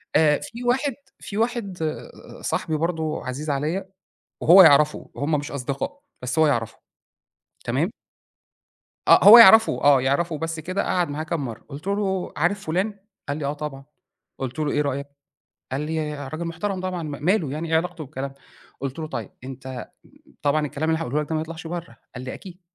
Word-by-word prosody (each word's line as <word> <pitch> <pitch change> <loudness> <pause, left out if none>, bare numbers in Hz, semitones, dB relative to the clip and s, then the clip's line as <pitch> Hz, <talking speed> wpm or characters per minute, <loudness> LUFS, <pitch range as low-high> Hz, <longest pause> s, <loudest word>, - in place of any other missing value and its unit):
آآ 150 -2 +4
في 235 +1 -8
واحد 265 +3 +1 0.3
في 200 - -7
واحد 225 -5 -1 0.6
صاحبي 155 - -1
برضه 160 -1 -2
عزيز 140 +4 -4
عليّا، 155 +7 -2 0.5
وهو 185 +4 +9
يعرفه 150 -1 +4
هُم 145 +3 -1
مش 145 - -7
أصدقاء 140 - -4 0.2
بس 125 +5 -2
هو 160 - +6
يعرفه، 115 -6 -1 0.9
تمام؟ - - 0 1.2
آه - - +7
هو 210 +5 +12
يعرَفه، 225 0 +8
آه 140 -2 +6
يعرَفه 150 +5 0
بس 165 +1 -4
كده 185 +5 -2
قعَد 175 -3 0
معاه 145 +2 -3
كام 160 -3 -3
مرّة 115 -3 -6
قُلت 150 +5 -9
له: 200 -2 -1
"عارف 185 +6 0
فلان؟"، 195 +6 -1 0.3
قال 145 - -1
لي: 150 - -4
"آه 140 - -1
طبعًا."، 145 -2 -7 0.5
قُلت 130 +2 -4
له: 150 -2 0
"إيه 145 - +1
رأيك؟"، 140 -1 -2 0.7
قال 135 - -1
لي: 155 0 -2
"راجل 155 +4 -5
محترَم 180 +4 -3
طبعًا، 185 -2 -3
م 155 - -5
ماله 180 -5 +2
يعني 160 +2 -4
إيه 160 - +4
علاقته 170 -1 -2
بالكلام 140 -1 -5
ده؟"، - - -25 0.4
قلت 135 +1 -4
له: 160 - -3
"طيب، 120 -9 -5
أنت 130 -1 -7 0.6
طبعًا 150 +1 +2
الكلام 150 +2 -3
اللي 160 0 +1
هاقوله 150 -1 -1
لك 150 - -9
ده - - 0
ما 155 - 0
يطلَعش 165 +1 -7
برّه."، 165 -7 -6 0.2
قال 125 - -7
لي: 130 - -5
"أكيد."، 180 -1 -11
155 Hz, 180 wpm, -24 LUFS, 140-180 Hz, 1.2 s, هو